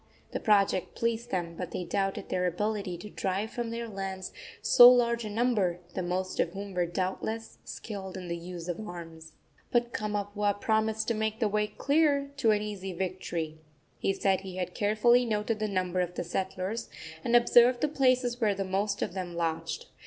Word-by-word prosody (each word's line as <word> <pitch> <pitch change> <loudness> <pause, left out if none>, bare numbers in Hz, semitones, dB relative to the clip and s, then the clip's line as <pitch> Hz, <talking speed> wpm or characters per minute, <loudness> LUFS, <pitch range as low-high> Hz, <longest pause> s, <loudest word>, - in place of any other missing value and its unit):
The - - -2
project 200 -4 +2
pleased 230 0 -1
them, 175 -3 -2
but 180 0 -5
they 180 - -4
doubted 195 +2 -2
their 180 0 +1
ability 200 0 -2
to 210 +5 -9
drive 195 +3 -2
from 240 -1 -3
their 230 0 -4
lands 195 -3 -5 0.3
so 245 0 +9
large 235 -1 +3
a - - -4
number, 210 -5 +1 0.2
the - - -2
most 185 +1 -2
of 170 - +1
whom 200 0 -6
were 175 -1 +1
doubtless 190 +5 -3
skilled 195 -4 -6
in 180 -1 -7
the 170 - -2
use 170 0 -7
of 175 +1 -3
arms. 165 -5 -8 0.4
But 240 -1 +1
Kamapuaa 205 -1 -1
promised 220 0 +1
to - - +2
make 220 0 -1
the 225 - +2
way 210 0 +1
clear 280 +4 +2
to 235 -5 +3
an 210 -1 +3
easy 195 -3 -5
victory. 170 -3 -3 0.4
He - - +1
said 195 -1 +1
he 190 -2 -8
had 180 -1 -3
carefully 220 +4 +4
noted 215 -1 -1
the 215 - 0
number 185 -2 -1
of 180 0 -1
the - - -2
settlers, 190 +4 -3 0.3
and 235 - +2
observed 240 +1 +6
the 300 - +3
places 255 -4 +2
where 210 -3 +3
the 195 0 -2
most 200 +2 0
of - - -3
them 180 -2 -5
lodged. 165 - -2
200 Hz, 190 wpm, -29 LUFS, 185-225 Hz, 0.4 s, so